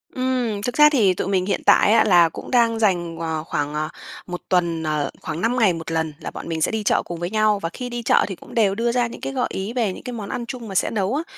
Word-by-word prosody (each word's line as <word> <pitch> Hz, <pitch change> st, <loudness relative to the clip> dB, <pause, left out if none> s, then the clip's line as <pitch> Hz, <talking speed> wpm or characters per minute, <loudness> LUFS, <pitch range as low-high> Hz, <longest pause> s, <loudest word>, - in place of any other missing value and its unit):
Ừm, 255 Hz, -5 st, -1 dB
thực 245 Hz, +4 st, -3 dB
ra 300 Hz, 0 st, +8 dB
thì 220 Hz, -11 st, +3 dB
tụi 180 Hz, -, -3 dB
mình 190 Hz, -2 st, +1 dB
hiện 200 Hz, -, -1 dB
tại 205 Hz, -, +5 dB
á, 225 Hz, -, +6 dB
là 175 Hz, -5 st, +5 dB
cũng -, -, -9 dB
đang 230 Hz, -2 st, +3 dB
dành, 175 Hz, -6 st, 0 dB
ờ, 160 Hz, -2 st, -3 dB
khoảng, 145 Hz, -2 st, -3 dB
à, 155 Hz, +1 st, -2 dB, 0.4 s
1 180 Hz, -1 st, -5 dB
tuần, 170 Hz, -3 st, +1 dB
ờ, 150 Hz, -2 st, -1 dB
khoảng 160 Hz, +1 st, -5 dB
5 235 Hz, +4 st, +1 dB
ngày 210 Hz, -6 st, +4 dB
1 165 Hz, 0 st, -6 dB
lần 160 Hz, -1 st, -1 dB
là -, -, -6 dB
bọn -, -, -8 dB
mình 160 Hz, -1 st, -3 dB
sẽ -, -, +2 dB
đi 220 Hz, -1 st, -2 dB
chợ -, -, +2 dB
cùng 170 Hz, -1 st, -6 dB
với 175 Hz, +1 st, -3 dB
nhau 215 Hz, 0 st, +2 dB
và 165 Hz, -, -3 dB
khi 250 Hz, -1 st, -5 dB
đi 240 Hz, -1 st, -5 dB
chợ -, -, +3 dB
thì 195 Hz, -, -5 dB
cũng -, -, -15 dB
đều 205 Hz, -4 st, +2 dB
đưa 235 Hz, +2 st, 0 dB
ra 240 Hz, 0 st, +1 dB
những 235 Hz, -, -10 dB
cái 270 Hz, -, -4 dB
gợi 255 Hz, -2 st, 0 dB
ý 195 Hz, +4 st, -4 dB
về 230 Hz, -6 st, 0 dB
những -, -, -11 dB
cái 250 Hz, -, -6 dB
món 210 Hz, -4 st, -6 dB
ăn 245 Hz, -2 st, -4 dB
chung 240 Hz, -2 st, -7 dB
mà 195 Hz, -, -7 dB
sẽ -, -, +2 dB
nấu 205 Hz, +2 st, -1 dB
á. 310 Hz, -, -1 dB
200 Hz, 295 wpm, -22 LUFS, 170-235 Hz, 0.4 s, ra